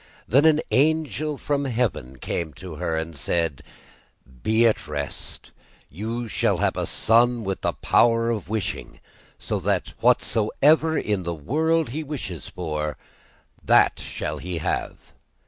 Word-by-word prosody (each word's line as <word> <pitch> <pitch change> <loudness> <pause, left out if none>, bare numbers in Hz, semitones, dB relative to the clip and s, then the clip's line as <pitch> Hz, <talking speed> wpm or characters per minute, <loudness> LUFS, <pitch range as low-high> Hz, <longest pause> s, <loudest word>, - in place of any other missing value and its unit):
Then 140 +7 +4
an 155 -1 +5
angel 155 +1 +1
from 140 0 -1
heaven 115 - -1
came 80 +4 -3
to 90 -5 -9
her 80 -1 -1
and 80 0 -4
said: 80 0 -1 0.8
'Be 110 - +3
at 110 -8 +2
rest, 75 -2 -6 0.4
you 115 +7 -4
shall - - +1
have - - +1
a - - -2
son 120 +1 +3
with 95 -1 -3
the - - 0
power 115 0 +3
of 105 -4 -4
wishing, 105 -2 -3 0.4
so - - -3
that - - -1
whatsoever 155 +9 +3
in 105 -3 0
the 85 -1 -3
world 160 - +1
he 155 +6 -4
wishes 125 - -6
for, 75 -3 -3 0.7
that - - +4
shall - - -4
he 90 -1 -4
have. 80 - -3
110 Hz, 140 wpm, -24 LUFS, 85-140 Hz, 0.8 s, an